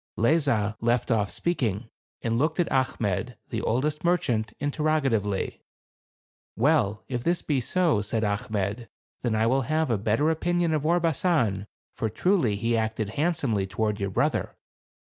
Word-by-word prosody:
Lezah 115 Hz, -5 st, +2 dB
left 120 Hz, +2 st, +1 dB
off 105 Hz, -3 st, +2 dB
speaking, 120 Hz, -, -1 dB, 0.4 s
and 115 Hz, 0 st, 0 dB
looked 155 Hz, +6 st, 0 dB
at 175 Hz, -, +3 dB
Achmet, 125 Hz, -3 st, 0 dB
the 110 Hz, -, -2 dB
oldest 145 Hz, +6 st, -1 dB
merchant, 120 Hz, -11 st, +1 dB
interrogatively. 140 Hz, -9 st, 0 dB, 0.9 s
"Well, 115 Hz, -5 st, +2 dB
if 125 Hz, -2 st, -3 dB
this 170 Hz, 0 st, 0 dB
be 140 Hz, -4 st, 0 dB
so," 165 Hz, -, +2 dB
said 110 Hz, +2 st, -2 dB
Achmet, 105 Hz, +2 st, -2 dB, 0.3 s
"then 120 Hz, -3 st, 0 dB
I 110 Hz, +1 st, +2 dB
will 130 Hz, +4 st, +3 dB
have 155 Hz, -3 st, +1 dB
a 110 Hz, -, +1 dB
better 115 Hz, +9 st, +2 dB
opinion 175 Hz, 0 st, 0 dB
of 155 Hz, 0 st, 0 dB
Orbasan; 160 Hz, -, +1 dB, 0.3 s
for 110 Hz, -, -2 dB
truly, 130 Hz, -, +1 dB
he 115 Hz, +3 st, 0 dB
acted 110 Hz, -1 st, -1 dB
handsomely 135 Hz, -, 0 dB
toward 105 Hz, +1 st, -1 dB
your 100 Hz, 0 st, -1 dB
brother." 95 Hz, -, 0 dB
120 Hz, 140 wpm, -26 LUFS, 110-155 Hz, 0.9 s, at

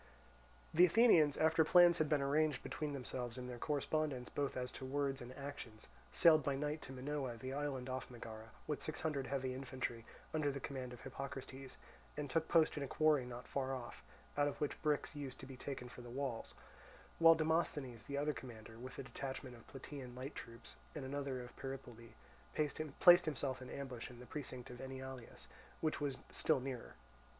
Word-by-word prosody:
The 170 Hz, -, +7 dB
Athenians, 170 Hz, -, +6 dB
after 160 Hz, +1 st, +5 dB
plans 175 Hz, +1 st, +7 dB
had 155 Hz, -2 st, +2 dB
been 150 Hz, -2 st, +3 dB
arranged 150 Hz, +2 st, +2 dB
between 150 Hz, -2 st, -3 dB
themselves 125 Hz, -2 st, -4 dB
and 125 Hz, -1 st, -5 dB
their 125 Hz, -1 st, -6 dB
correspondents 145 Hz, -3 st, 0 dB
both 140 Hz, -2 st, -1 dB
as 125 Hz, 0 st, -2 dB
to -, -, -8 dB
words 140 Hz, +1 st, 0 dB
and 120 Hz, +1 st, -7 dB
actions, 140 Hz, -6 st, -7 dB, 0.3 s
sailed 160 Hz, -2 st, +7 dB
by 140 Hz, -1 st, 0 dB
night 150 Hz, +2 st, -1 dB
to -, -, -8 dB
Minoa, 135 Hz, -2 st, -3 dB
the 130 Hz, +3 st, -5 dB
island 140 Hz, -3 st, -2 dB
off 130 Hz, +1 st, -3 dB
Megara, 110 Hz, -2 st, -8 dB, 0.2 s
with 150 Hz, -, -2 dB
six 155 Hz, -, -4 dB
hundred 145 Hz, -4 st, -1 dB
heavy 130 Hz, -2 st, -1 dB
infantry 130 Hz, -3 st, -3 dB, 0.3 s
under 155 Hz, -2 st, +2 dB
the 140 Hz, -, -4 dB
command 130 Hz, -2 st, -4 dB
of 125 Hz, -, -9 dB
Hippocrates, 135 Hz, 0 st, -6 dB, 0.4 s
and 150 Hz, -1 st, -2 dB
took 160 Hz, -1 st, +2 dB
post 160 Hz, -2 st, +4 dB
in -, -, -1 dB
a 140 Hz, -, -1 dB
quarry 150 Hz, -3 st, +3 dB
not 125 Hz, 0 st, -7 dB
far 135 Hz, -1 st, -1 dB
off, 120 Hz, -2 st, -7 dB, 0.3 s
out 145 Hz, 0 st, +4 dB
of 145 Hz, -, -3 dB
which 150 Hz, -, -1 dB
bricks 150 Hz, 0 st, +1 dB
used 135 Hz, -3 st, -5 dB
to -, -, -7 dB
be 135 Hz, 0 st, -8 dB
taken 125 Hz, -1 st, -5 dB
for 125 Hz, -, -10 dB
the 120 Hz, -, -9 dB
walls; 130 Hz, -2 st, -3 dB, 0.6 s
while 165 Hz, 0 st, +9 dB
Demosthenes, 155 Hz, -6 st, 0 dB
the 140 Hz, -, -3 dB
other 150 Hz, +1 st, +1 dB
commander, 115 Hz, -4 st, -9 dB
with 130 Hz, +1 st, -8 dB
a -, -, -4 dB
detachment 130 Hz, -1 st, -5 dB
of 115 Hz, -, -15 dB
Plataean 135 Hz, -2 st, -8 dB
light 130 Hz, +3 st, -5 dB
troops 115 Hz, 0 st, -9 dB, 0.2 s
and 145 Hz, -3 st, -4 dB
another 135 Hz, -2 st, -2 dB
of 120 Hz, -, -11 dB
Peripoli, 120 Hz, -4 st, -7 dB, 0.4 s
placed 155 Hz, +4 st, +6 dB
himself 130 Hz, -3 st, -1 dB
in 130 Hz, -, -7 dB
ambush 130 Hz, -4 st, -5 dB
in 120 Hz, -1 st, -11 dB
the 125 Hz, -, -9 dB
precinct 130 Hz, -4 st, -6 dB
of 125 Hz, +1 st, -8 dB
Enyalius, 130 Hz, -2 st, -7 dB, 0.3 s
which 155 Hz, -1 st, 0 dB
was 140 Hz, -3 st, 0 dB
still 155 Hz, -4 st, +3 dB
nearer. 130 Hz, -2 st, -5 dB
135 Hz, 190 wpm, -38 LUFS, 125-150 Hz, 0.6 s, while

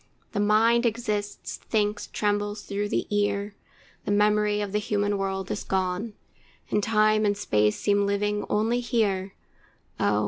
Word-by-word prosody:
The 205 Hz, -, -2 dB
mind 225 Hz, +3 st, +4 dB
exists, 210 Hz, -3 st, -3 dB
thinks, 210 Hz, -1 st, -1 dB
trembles 205 Hz, 0 st, -1 dB
through 205 Hz, +1 st, -3 dB
the -, -, 0 dB
ear, 205 Hz, 0 st, 0 dB, 0.5 s
The -, -, -1 dB
memory 210 Hz, 0 st, +3 dB
of 205 Hz, -1 st, -3 dB
the 210 Hz, -, +1 dB
human 205 Hz, 0 st, 0 dB
world 195 Hz, -1 st, -2 dB
is -, -, -3 dB
gone, 190 Hz, +3 st, -1 dB, 0.6 s
And 210 Hz, -, +2 dB
time 215 Hz, 0 st, +3 dB
and 205 Hz, -1 st, +1 dB
space 105 Hz, -, +1 dB
seem 200 Hz, -1 st, +2 dB
living 205 Hz, +1 st, 0 dB
only 225 Hz, +3 st, +1 dB
here. 205 Hz, -6 st, 0 dB, 0.6 s
Oh! 105 Hz, -, +2 dB
205 Hz, 145 wpm, -26 LUFS, 200-215 Hz, 0.6 s, mind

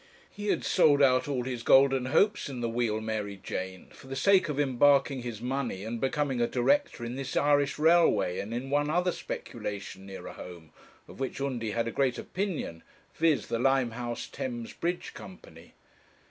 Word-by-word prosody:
He 205 Hz, 0 st, -6 dB
had -, -, +1 dB
sold 145 Hz, -5 st, +4 dB
out 130 Hz, +1 st, +4 dB
all 135 Hz, -4 st, -1 dB
his 125 Hz, -2 st, -4 dB
golden 135 Hz, +1 st, +5 dB
hopes 205 Hz, +6 st, +2 dB
in 130 Hz, -3 st, -6 dB
the 120 Hz, -, 0 dB
Wheal 115 Hz, -2 st, 0 dB
Mary 110 Hz, -2 st, -3 dB
Jane 95 Hz, -1 st, -6 dB
for -, -, -15 dB
the 135 Hz, -, -5 dB
sake 185 Hz, +5 st, +4 dB
of 145 Hz, -1 st, -2 dB
embarking 140 Hz, 0 st, +3 dB
his 120 Hz, -3 st, -6 dB
money 125 Hz, -6 st, -2 dB
and 115 Hz, +1 st, -4 dB
becoming 135 Hz, -2 st, 0 dB
a 120 Hz, -, +3 dB
director 130 Hz, -, +1 dB
in 120 Hz, -, -4 dB
this 135 Hz, -1 st, -3 dB
Irish 145 Hz, -1 st, +2 dB
Railway, 160 Hz, -, +3 dB
and 100 Hz, -, -5 dB
in 125 Hz, +3 st, -4 dB
one 145 Hz, +1 st, +2 dB
other 180 Hz, +3 st, +2 dB
speculation 100 Hz, -, -6 dB
nearer 95 Hz, -2 st, -8 dB
home, 85 Hz, -4 st, -11 dB, 0.4 s
of -, -, -13 dB
which 135 Hz, 0 st, -3 dB
Undy 125 Hz, -5 st, -2 dB
had 115 Hz, +2 st, -1 dB
a -, -, -2 dB
great 130 Hz, -2 st, +1 dB
opinion, 180 Hz, -, -4 dB, 0.3 s
viz.: 160 Hz, -3 st, +2 dB
the 115 Hz, -, -2 dB
Limehouse 120 Hz, -2 st, 0 dB
Thames 240 Hz, -3 st, -5 dB
Bridge 175 Hz, +1 st, -3 dB
Company. -, -, -13 dB
130 Hz, 175 wpm, -29 LUFS, 115-145 Hz, 0.4 s, golden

